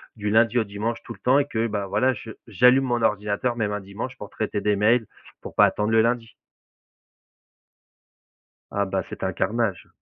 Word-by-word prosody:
du 105 -2 -3
lundi 115 +2 +4
au - - +2
dimanche, 105 +3 -4
tout - - -8
le - - -18
temps, 130 +3 +3
et 145 - +1
que, 115 -4 -1
bah, 100 -2 -3
voilà, 110 +7 +2
j 115 -1 -10 0.2
j'allume 125 +6 +5
mon 120 -2 0
ordinateur 105 +2 0
même 105 -3 -1
un 105 - -2
dimanche 110 +6 -7
pour 105 - -9
traiter 105 -2 -3
des 105 -1 +2
mails, 110 +3 +3 0.4
pour - - -9
pas - - +7
attendre 105 +1 0
le 110 0 +5
lundi. 115 0 -1 2.4
Ah, 100 0 0
bah, 95 - -2
c'était - - -6
un - - -2
carnage. 110 -3 -1
110 Hz, 190 wpm, -24 LUFS, 105-120 Hz, 2.4 s, pas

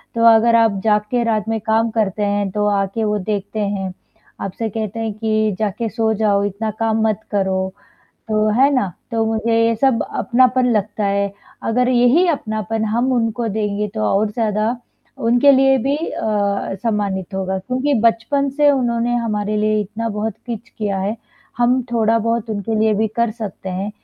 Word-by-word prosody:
तो 230 - +1
अगर 230 +1 +4
आप 225 -4 +3
जाग 210 -1 +3
के 240 -1 +1
रात 220 -2 0
में 225 0 0
काम 225 +1 +1
करते 210 -2 0
हैं, 205 -1 0
तो 210 +1 -1
आके 200 +2 -1
वो 210 0 +1
देखते 205 +2 -3
हैं। 195 -2 -2 0.5
आपसे 215 +4 -3
कहते 220 +1 -4
हैं 225 -1 -2
कि 215 -2 0
जाके 220 +2 -1
सो 220 -1 0
जाओ, 200 -2 +1
इतना 210 +2 -2
काम 225 -1 +1
मत 215 -1 0
करो, 190 -2 0 0.6
तो 215 0 +2
है 280 +1 +6
ना? 200 -9 0 0.2
तो 225 -1 +1
मुझे 225 +1 0
ये 230 0 +2
सब 260 -1 +2
अपनापन 255 +1 +2
लगता 210 0 -1
है। 200 0 0 0.3
अगर 250 +2 +2
यही 250 +8 +4
अपनापन 220 - -2
हम 240 +4 0
उनको 230 -1 0
देंगे, 210 0 -2
तो 215 +2 -6 0.2
और 210 0 0
ज़्यादा 220 +1 0 0.5
उनके 245 +4 +5
लिए 270 0 +5
भी 280 +2 +1
अ, 205 -10 -1
सम्मानित 200 -4 -2
होगा, 190 0 -2
क्योंकि 255 +8 -1
बचपन 230 +5 +1
से 295 -1 +5
उन्होंने 240 -3 0
हमारे 215 -3 -1
लिए 215 0 +1
इतना 215 +3 -4
बहुत 215 0 -2
कुछ 230 -1 -6
किया 205 -3 -1
है, 205 +4 -2 0.4
हम 250 +1 +3
थोड़ा-बहुत 230 0 +1
उनके 215 +1 -2
लिए 220 -1 +3
भी 220 +1 +1
कर 235 -1 +2
सकते 210 -4 -7
हैं। 195 +3 -3
220 Hz, 175 wpm, -19 LUFS, 205-235 Hz, 0.6 s, है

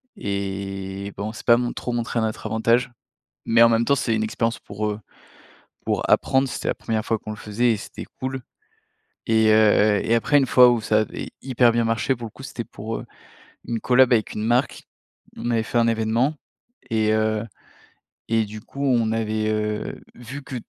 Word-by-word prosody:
et 100 - -4
bon, 105 +1 -3
on - - -8
s'est - - -9
pas 120 - +5
mon 120 0 -2
trop 125 - -4
montrés 120 0 -2
à - - 0
notre 110 0 -3
avantage. 115 +3 +1 0.5
Mais 115 0 +4
en 115 - +8
même 115 0 +2
temps, 140 - +3
c'est 115 -4 0
une 110 - 0
expérience 115 +1 -1
pour, 105 +1 -4
heu, 105 - -6 0.8
pour - - -1
apprendre, 135 +1 +3
c'était - - -5
la - - +1
1ère 110 -1 -2
fois 115 - 0
qu'on 110 - -8
le 105 - -7
faisait 115 +3 0
et 110 - 0
c'était - - -9
cool 130 0 -3 0.9
et 110 -1 +4
heu, - - +6 0.5
heu - - -4
et 115 - +3
après 145 +5 +3
une 135 - +2
fois 125 0 +7
où 120 -2 +1
ça 110 0 +2
avait 110 - -4
hyper 125 -2 +3
bien 120 0 +1
marché, 115 +4 0
pour 115 0 -7
le - - -9
coup, 130 - -14
c'était 120 -3 -6
pour, 110 +1 -6
heu, - - -7 0.6
une 115 -1 -2
collab 130 +2 +4
avec 110 -3 +1
une 105 - -4
marque, 120 +4 0 0.5
on 120 - -3
avait 115 -1 +1
fait 120 - -2
un 115 0 +4
événement 115 +6 +1 0.5
et 110 -1 +2
heu 110 0 +1 0.9
et 115 -1 +2
du 105 +1 -9
coup 140 +6 -5
on 120 -4 +2
avait, 110 -1 -1
heu, 105 0 -2 0.2
vu 130 +4 -9
que 135 - -8
115 Hz, 205 wpm, -23 LUFS, 110-120 Hz, 0.9 s, en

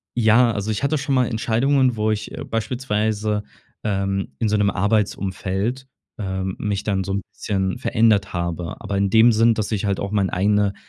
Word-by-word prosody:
ja 120 +1 +4
also, 105 0 -2
ich 105 - -2
hatte 150 +2 +1
schon 140 0 -2
mal 125 -2 +3
Entscheidungen, 125 +3 +1
wo 110 0 0
ich, 110 0 -3
äh, - - -6
beispielsweise, 110 -3 -1 0.4
ähm, 100 -2 -1
in 110 - +1
so 105 - +2
'nem 100 -1 +2
Arbeitsumfeld, 100 +3 -1 0.3
ähm, 95 -2 -3
mich 105 -2 -2
dann 95 -2 0
so 95 - -3
'n 100 - -1
bisschen 95 -2 -2
verändert 110 -3 +2
habe. 85 -1 -4
Aber 100 -1 -3
in 100 0 +1
dem 115 +1 +6
Sinn, 115 +1 +4
dass 110 -1 -3
ich 105 -1 -1
halt 100 -1 0
auch 100 0 -3
mein 100 -3 +1
eigene 100 +1 +2
105 Hz, 190 wpm, -22 LUFS, 100-115 Hz, 0.4 s, dem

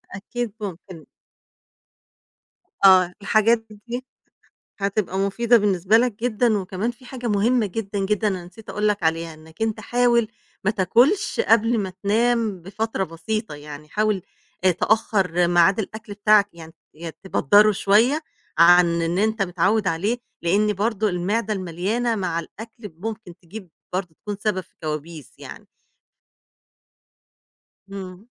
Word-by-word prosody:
أكيد 225 +2 -5
ممكن. 185 -4 -8 1.8
آه. 185 -2 +6
الحاجات 215 +3 +3
د 210 -1 -14
دي 245 +2 -5 0.7
هتبقى 195 -1 -1
مفيدة 235 +5 +3
بالنسبة 200 0 +3
لك 245 0 +2
جدًا 230 -2 +2
وكمان 190 +4 -3
في 250 +2 -15
حاجة 245 -1 -7
مهمة 220 +2 +2
جدًا، 200 +1 -4
جدًا 210 +2 0
أنا 185 -3 -3
نسيت 185 +5 -12
أقول 210 0 0
لك 205 -3 -1
عليها، 165 0 -1
إنّك 160 +6 -11
أنت 220 -1 -1
حاول 240 0 +2 0.4
ما 210 - +3
تاكُلش 240 - +2
قبل 230 - +3
ما 190 -2 -2
تنام 220 -2 +1
بفترة 200 +1 -3
بسيطة، 215 +3 -4
يعني 150 +1 -10
حاول 210 -2 0 0.4
آآ 185 - +6
تأخَّر 180 -3 +1
ميعاد 175 +3 +4
الأكل 220 0 -6
بتاعك، 205 0 +4
يعني 165 -1 -12 0.2
يا 165 +1 -7
تبدَّره 205 +3 +4
شوية 230 - +3 0.4
عن 170 0 +6
إن 170 +3 -1
أنت 220 0 +1
متعوِّد 195 +3 +1
عليه، 205 +9 -1 0.2
لإن 205 +5 +2
برضه 215 +1 0
المعدة 200 +5 -1
المليانة 195 +7 -2
مع 175 -4 -2
الأكل 225 +3 -11
ممكن 215 -3 -6
تجيب 185 0 -10 0.2
برضه 180 -3 -3
تكون 205 +5 -6
سبب 205 -3 0
في - - -19
كوابيس 155 -1 -6
يعني. - - -11 2.3
إمم. 190 +1 -8
200 Hz, 135 wpm, -22 LUFS, 180-220 Hz, 2.3 s, آه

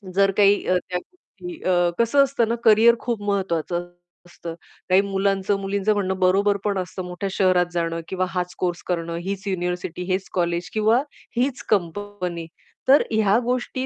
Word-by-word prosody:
जर 195 0 +4
काही 205 0 +5
अ, 185 - +3
त्या 180 - -1
गोष्टी 355 - -12
अ 175 -1 +3
कसं 255 +5 +4
असतं 270 -4 0
ना, 230 - 0
कॅरियर 225 +1 +6
खूप 235 -4 -3
महत्त्वाचं 175 -4 -1 0.4
असतं. 170 -1 -8 0.4
काही 185 +1 +6
मुलांचं-मुलींचं 195 +1 0
म्हणणं 190 -2 -1
बरोबर 195 +2 +3
पण 205 -2 0
असतं 185 0 -4
मोठ्या 180 +2 -4
शहरात 185 -2 +3
जाणं 165 -1 -2
किंवा 185 -1 -1
हाच 180 0 -3
कोर्स 175 -1 -1
करणं, 170 -2 -2
हीच 195 +1 -4
युनिव्हर्सिटी, 180 -1 -3
हेच 190 +1 -1
कॉलेज 170 -1 -1
किंवा 220 +3 +3 0.3
हीच 255 +2 0
कंपनी. 180 -2 -2 0.4
तर 275 +3 +7
ह्या 215 -1 +3
गोष्टी 255 +1 -2
195 Hz, 155 wpm, -23 LUFS, 180-210 Hz, 0.4 s, तर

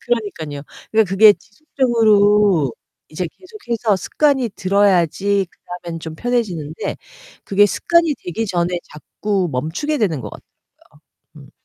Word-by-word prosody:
그러니깐요. 180 -12 -3 0.3
그러니까 220 -2 +3
그게 205 +3 +7
지속적으로 210 - +2 0.4
이제 175 +4 -4
계속해서 240 - -3
습관이 270 +2 +1
들어야지 195 0 +2
그다음엔 175 -2 -8
좀 160 -1 -7
편해지는데 180 -8 -3 0.5
그게 205 +1 +4
습관이 335 - +2
되기 220 +6 -3
전에 175 -2 -1
자꾸 190 +4 -3
멈추게 165 - -2
되는 170 - 0
것 105 -4 -7
같더라고요. - - -13 1.0
음. - - -20
200 Hz, 320 characters per minute, -19 LUFS, 170-230 Hz, 1.0 s, 그게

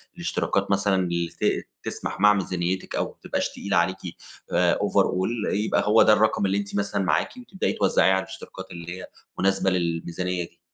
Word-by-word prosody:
الاشتراكات 135 - -1
مثلًا 100 0 +2
اللي 85 -1 -1
ت - - +1 0.2
تسْمَح - - -5
مع 105 +1 +7
ميزانيتِك 95 -1 -2
أو - - +1
ما - - -11
تبقاش - - -1
تقيلة 100 - -2
عليكِ 90 +2 +2 0.5
آآ - - +3
overall، 105 +5 +1
يبقى 105 +2 +1
هو 110 +2 +6
ده 110 - +7
الرقم 110 -1 +2
اللي 95 +1 +1
أنتِ 100 0 -4
مثلًا 100 -1 0
معاكِ 85 - 0
وتبدئي 215 -6 -2
توزَّعيه 95 -1 +3
على 95 0 +1
الاشتراكات 95 0 -10
اللي 85 +1 -7
هي - - -8 0.3
مناسبة 95 0 +2
للميزانية 90 0 -1
دي. 85 0 -14
95 Hz, 175 wpm, -25 LUFS, 90-100 Hz, 0.5 s, مع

